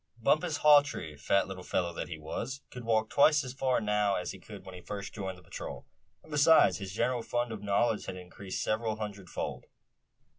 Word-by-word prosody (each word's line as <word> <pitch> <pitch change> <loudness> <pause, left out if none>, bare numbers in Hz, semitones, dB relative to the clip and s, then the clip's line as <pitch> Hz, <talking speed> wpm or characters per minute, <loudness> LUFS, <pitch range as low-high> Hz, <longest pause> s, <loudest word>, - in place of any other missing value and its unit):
Bumpus 155 +7 +2
Hawtree, 145 - +5
fat 85 +7 +1
little 95 -1 -7
fellow 90 -1 -1
that - - -4
he 80 - -6
was, 115 - -5
could 125 - -8
walk 110 -1 +2
twice 150 +1 +5
as 130 -1 -6
far 130 -1 +1
now 105 -2 +1
as 90 - -3 0.3
when 95 - -11
he 90 - -9
first 100 +2 -6
joined 95 -3 -5
the 90 - -17
patrol; - - -7 0.4
and - - -16
besides, 150 - +5
his 95 -1 -6
general 120 +4 0
fund 120 +1 -1
of 110 - -6
knowledge 105 +2 +1
had - - -4
increased 95 +1 -6
several 110 0 0
hundred 100 -4 -6
fold. 60 - -4
105 Hz, 190 wpm, -31 LUFS, 95-125 Hz, 0.4 s, Hawtree